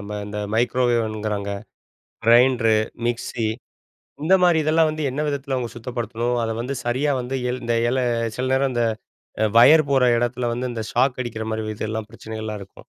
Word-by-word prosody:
நம்ம 105 Hz, +1 st, -6 dB
இந்த 105 Hz, 0 st, -5 dB, 0.2 s
microwave 120 Hz, 0 st, +2 dB
ங்கிறாங்க, 105 Hz, -1 st, -3 dB, 0.7 s
grinder, 120 Hz, -1 st, +5 dB, 0.3 s
mixie 120 Hz, -1 st, -2 dB, 0.8 s
இந்த 180 Hz, -, +3 dB
மாதிரி 175 Hz, -2 st, +5 dB
இதெல்லாம் 155 Hz, +1 st, +3 dB
வந்து 155 Hz, 0 st, -3 dB
என்ன 145 Hz, +4 st, -2 dB
விதத்தில 140 Hz, -1 st, -2 dB
அவங்க 125 Hz, -2 st, -2 dB
சுத்தப்படுத்தணும்? 120 Hz, 0 st, -3 dB
அத 115 Hz, -, -1 dB
வந்து 130 Hz, +3 st, -3 dB
சரியா 130 Hz, +5 st, +1 dB
வந்து 125 Hz, +2 st, -4 dB, 0.3 s
இந்த 115 Hz, 0 st, 0 dB
இல் 120 Hz, -, +1 dB
எல 130 Hz, -, +1 dB, 0.4 s
சில 130 Hz, +1 st, -1 dB
நேரம் 135 Hz, 0 st, +2 dB
இந்த 120 Hz, -, +1 dB, 0.6 s
அ -, -, +4 dB
வயர் 150 Hz, +4 st, +7 dB
போற 135 Hz, -2 st, +4 dB
எடத்துல 120 Hz, 0 st, -1 dB
வந்து 125 Hz, +2 st, -2 dB
இந்த 110 Hz, -1 st, -4 dB
ஷாக் 130 Hz, +1 st, +2 dB
அடிக்கிற 110 Hz, -2 st, -5 dB
மாதிரி 110 Hz, -1 st, -3 dB
இதெல்லாம் 110 Hz, 0 st, -4 dB
பிரச்சனைகள்லாம் 110 Hz, -2 st, -6 dB
இருக்கும், 95 Hz, -, -16 dB
120 Hz, 170 wpm, -22 LUFS, 110-130 Hz, 0.8 s, வயர்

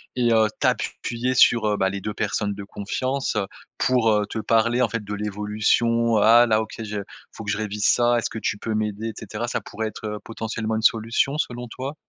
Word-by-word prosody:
et 120 Hz, -2 st, +2 dB
heu, 110 Hz, -1 st, +4 dB
t'appuyer 120 Hz, +2 st, -1 dB
sur, 120 Hz, -2 st, +5 dB
heu, 105 Hz, -1 st, +1 dB
bah, 95 Hz, -1 st, +2 dB
les 100 Hz, 0 st, -5 dB
2 105 Hz, +2 st, -4 dB
personnes 105 Hz, -1 st, -1 dB
de 100 Hz, -, -7 dB
confiance, 130 Hz, +7 st, -3 dB
heu, 105 Hz, -2 st, 0 dB, 0.3 s
pour, 125 Hz, -3 st, +3 dB
heu, 105 Hz, -1 st, +2 dB
te -, -, -5 dB
parler 115 Hz, +3 st, +2 dB
en 120 Hz, -, +3 dB
fait 115 Hz, -1 st, -3 dB
de 105 Hz, 0 st, -6 dB
l'évolution: 105 Hz, +3 st, +1 dB
«Ah 115 Hz, +3 st, +7 dB
là, 110 Hz, -1 st, +3 dB
OK, 110 Hz, -, -7 dB
je 105 Hz, -1 st, -4 dB, 0.3 s
faut 110 Hz, -, -9 dB
que 100 Hz, -, -5 dB
je -, -, -1 dB
révise 105 Hz, -1 st, -2 dB
ça, 120 Hz, 0 st, +4 dB
est-ce -, -, -2 dB
que 110 Hz, -, -7 dB
tu 105 Hz, -, -1 dB
peux 110 Hz, 0 st, -3 dB
m'aider?» 105 Hz, 0 st, -2 dB
et -, -, -6 dB
cetera. 110 Hz, +2 st, -5 dB
Ça -, -, -1 dB
pourrait 110 Hz, +1 st, -4 dB
être, 110 Hz, -, -8 dB
heu, 105 Hz, 0 st, -4 dB
potentiellement 110 Hz, -1 st, -3 dB
une 110 Hz, -, -1 dB
solution 115 Hz, +6 st, +2 dB
selon 125 Hz, -3 st, -3 dB
toi? 130 Hz, +5 st, -6 dB
110 Hz, 225 wpm, -23 LUFS, 105-115 Hz, 0.3 s, Ah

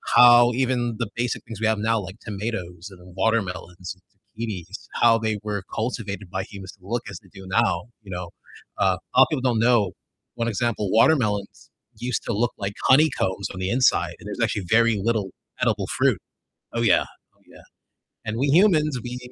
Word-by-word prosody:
how 120 Hz, 0 st, +8 dB
even 120 Hz, -2 st, 0 dB
the 115 Hz, -3 st, -2 dB
basic 120 Hz, 0 st, -2 dB
things 115 Hz, -3 st, -9 dB
we 110 Hz, -, +1 dB
have 110 Hz, -1 st, +1 dB
now, 115 Hz, +1 st, +1 dB
like 95 Hz, +2 st, -8 dB
tomatoes 95 Hz, -4 st, -5 dB
and 90 Hz, -1 st, -15 dB
watermelons 95 Hz, -4 st, -2 dB, 0.4 s
and 115 Hz, -, -3 dB
zucchinis, 95 Hz, -2 st, -7 dB
how 115 Hz, -1 st, +4 dB
they 110 Hz, -1 st, -1 dB
were 105 Hz, -2 st, -3 dB
cultivated 105 Hz, -4 st, -4 dB
by 95 Hz, 0 st, -2 dB
humans 95 Hz, -2 st, -9 dB
to 100 Hz, -, -24 dB
look 120 Hz, +2 st, -2 dB
as 95 Hz, -, -8 dB
they 95 Hz, -, -21 dB
do 95 Hz, -1 st, -11 dB
now, 95 Hz, 0 st, +1 dB, 0.2 s
you 95 Hz, -, -11 dB
know? 90 Hz, -1 st, -5 dB, 0.5 s
Uh, 95 Hz, -2 st, +3 dB, 0.2 s
lotta 130 Hz, -, +7 dB
people 145 Hz, -, -1 dB
don't 125 Hz, -3 st, +1 dB
know 115 Hz, -5 st, +3 dB, 0.4 s
1 115 Hz, -, -1 dB
example, 110 Hz, -2 st, -1 dB
watermelons 110 Hz, -5 st, +2 dB, 0.3 s
used 125 Hz, 0 st, -2 dB
to 120 Hz, -, -2 dB
look 115 Hz, +3 st, +1 dB
like 100 Hz, +1 st, -3 dB
honeycombs 130 Hz, -9 st, +3 dB
on 95 Hz, -, -8 dB
the 95 Hz, -, -2 dB
inside, 125 Hz, +3 st, +2 dB
and -, -, -14 dB
there's -, -, -6 dB
actually 100 Hz, -, -1 dB
very 115 Hz, +1 st, +4 dB
little 105 Hz, -2 st, 0 dB, 0.3 s
edible -, -, +1 dB
fruit. -, -, +3 dB, 0.6 s
Oh, 115 Hz, -, -1 dB
yeah, 115 Hz, -, +4 dB, 0.3 s
oh, -, -, -34 dB
yeah. -, -, -15 dB, 0.6 s
And 110 Hz, +1 st, -3 dB
we 140 Hz, +2 st, +1 dB
humans, 155 Hz, -6 st, +4 dB
we 125 Hz, 0 st, -5 dB
110 Hz, 185 wpm, -24 LUFS, 95-120 Hz, 0.6 s, how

